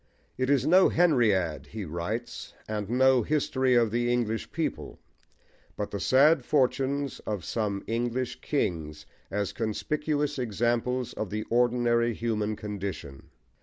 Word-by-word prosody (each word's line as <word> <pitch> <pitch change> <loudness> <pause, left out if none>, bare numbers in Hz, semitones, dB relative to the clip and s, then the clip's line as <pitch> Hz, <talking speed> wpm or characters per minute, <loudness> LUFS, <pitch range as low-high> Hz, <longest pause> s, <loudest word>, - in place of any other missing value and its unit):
It 130 0 -1
is 140 -2 +3
no 185 +4 +6
Henriade 100 - +2
he 105 +2 -6
writes, 85 +9 -5
and 105 -2 -3
no 130 +1 +4
history 130 -1 +1
of 115 -3 +3
the 120 +1 +1
English 115 -3 -1
people, - - -4 0.8
but 105 - -3
the 100 - -3
sad 140 +4 +4
fortunes 140 +1 0
of 105 -5 -3
some 105 -3 -2
English 120 +2 -2
kings 75 -3 -2 0.2
as 100 0 -2
conspicuous 145 +6 -2
examples 120 +2 -1
of 110 - -4
the 110 +2 -3
ordinary 120 -1 +2
human 110 -2 -1
condition. 100 -10 -6
120 Hz, 130 wpm, -28 LUFS, 105-130 Hz, 0.8 s, no